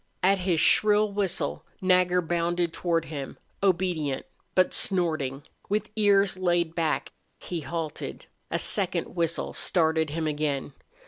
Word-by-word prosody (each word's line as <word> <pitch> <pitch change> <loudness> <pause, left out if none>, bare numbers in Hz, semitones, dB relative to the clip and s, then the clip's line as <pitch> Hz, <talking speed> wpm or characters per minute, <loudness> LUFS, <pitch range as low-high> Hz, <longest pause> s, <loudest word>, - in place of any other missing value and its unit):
At 195 +1 +4
his 180 -3 +1
shrill 210 +4 +4
whistle 195 -3 -1 0.2
Nagger 180 -1 +3
bounded 170 0 0
toward 165 -2 0
him, 140 -4 -6 0.2
obedient, 175 -7 0 0.3
but 185 -1 +4
snorting, 155 -8 +1 0.3
with 210 +1 -1
ears 200 -3 +3
laid 175 -3 +1
back. 165 -2 -1 0.3
He 175 - -4
halted. 160 0 -5 0.2
A - - 0
second - - -1
whistle 170 -1 -1
started 160 -2 +2
him 160 +2 -2
again. 145 -2 -2
170 Hz, 125 wpm, -27 LUFS, 160-185 Hz, 0.3 s, At